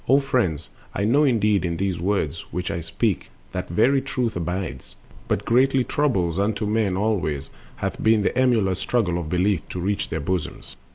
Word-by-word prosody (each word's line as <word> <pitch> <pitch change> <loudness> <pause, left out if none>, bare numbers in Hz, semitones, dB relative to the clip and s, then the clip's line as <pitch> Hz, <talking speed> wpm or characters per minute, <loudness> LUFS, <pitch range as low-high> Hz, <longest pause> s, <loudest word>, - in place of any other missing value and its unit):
O 135 +2 +6
friends, 110 - -1 0.2
I 100 - 0
know 140 +8 +4
indeed 105 -6 +2
in 85 -2 -1
these 95 -1 -1
the 85 - -6
words 90 -5 -1
Which 90 +1 -2
I - - -2
will - - -4
speak 85 - -1 0.2
that - - -4
very 135 +1 +3
truth 125 -4 -2
abides; 90 -5 -4 0.3
But - - -1
greatly 130 +2 +3
troublous 95 - 0
unto 105 +1 0
men 105 -3 +1
alway 95 -8 0 0.4
Hath - - -4
been 110 -1 +4
the - - 0
emulous 110 -8 +2
struggle 95 -7 0
of 80 -3 -5
Belief 90 -1 +1
To 90 - -5
reach 100 +3 -1
their 80 - -2
bosoms. 85 +3 -3
100 Hz, 185 wpm, -23 LUFS, 90-115 Hz, 0.4 s, O